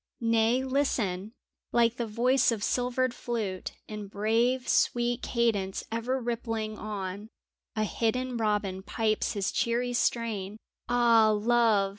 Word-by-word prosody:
Nay, 230 +2 +2
listen! 225 -8 -1 0.4
Like 235 0 +3
the 235 - -2
voice 250 +4 +3
of 215 -3 -3
silvered 250 0 0
flute, 215 -8 -4
In 210 -1 -6
brave, 230 +5 +1
sweet 240 0 +2
cadence 215 -6 0
ever 235 +4 -1
rippling 225 -2 -3
on, 205 0 -5 0.5
A 215 - +1
hidden 245 +4 -1
robin 210 -4 -1
pipes 215 +2 -1
his 200 -2 -1
cheery 245 +1 0
strain! 215 -4 -1 0.3
Ah, 235 -2 +5
Love 215 -2 +3
230 Hz, 120 wpm, -28 LUFS, 210-240 Hz, 0.5 s, Ah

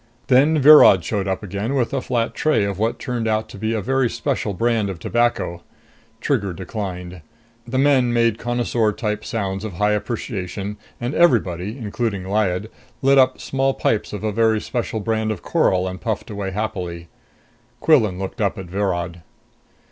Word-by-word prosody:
Then 140 +5 +5
Virod 140 - +8
showed 100 0 -2
up 95 +2 -2
again 100 +7 -3
with 125 -2 0
a 135 - 0
flat 120 -2 -1
tray 155 -8 +1
of 100 -1 -3
what 115 +2 0
turned 120 -4 -3
out 110 0 0
to - - -10
be 110 +2 -1
a 110 - -1
very 135 +1 +1
special 130 -6 -2
brand 115 0 +1
of 95 - -5
tobacco. 120 -5 0 0.6
Trigger 110 -8 -1
declined. 90 -1 -6 0.5
The 130 +2 -2
men 135 -3 +3
made 115 -2 +2
connoisseur 120 -2 0
type 105 -1 -3
sounds 100 -3 -3
of 110 -4 -5
high 105 +5 +1
appreciation, 105 -2 -3 0.2
and 120 +3 -3
everybody, 105 - +2
including 110 -4 -3
Lyad, 100 +1 -1 0.3
lit 135 0 +5
up 130 0 +3
small 135 0 0
pipes 110 - 0
of 105 - -6
a 110 - 0
very 110 0 +2
special 115 -2 -3
brand 110 0 -1
of 100 - -6
coral 95 0 +1
and 95 0 -6
puffed 110 -1 -3
away 100 -2 -3
happily. 90 -4 -4 0.7
Quillan 110 - +3
looked 95 +3 -5
up 100 -2 0
at 95 - -6
Virod. 85 -2 -2
110 Hz, 170 wpm, -21 LUFS, 95-120 Hz, 0.7 s, Virod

